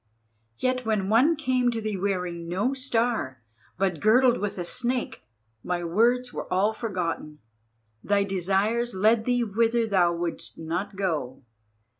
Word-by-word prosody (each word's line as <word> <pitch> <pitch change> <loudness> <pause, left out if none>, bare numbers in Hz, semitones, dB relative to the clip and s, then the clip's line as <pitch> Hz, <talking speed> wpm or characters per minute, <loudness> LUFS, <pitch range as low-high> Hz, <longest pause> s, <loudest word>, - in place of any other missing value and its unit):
Yet 255 0 0
when 215 -4 0
one 260 +10 +4
came 255 -5 +1
to 230 -1 -2
thee 215 -2 -3
wearing 180 -3 -2
no 200 +10 0
Star 235 - -1 0.4
but 190 -4 0
girdled 245 - +4
with 205 0 -3
a 175 - -2
Snake, 250 +5 -1 0.4
my 175 -1 -2
words 240 +8 +1
were - - -6
all 195 +4 +2
forgotten, 175 -9 -4 0.7
thy 200 0 +2
desires 200 +5 0
led 220 +3 +3
thee 245 -1 +2
whither 230 +2 +1
thou 185 -5 +3
wouldst 170 0 -4
not 180 +5 -4
go. 155 -10 -3
205 Hz, 140 wpm, -26 LUFS, 180-240 Hz, 0.7 s, one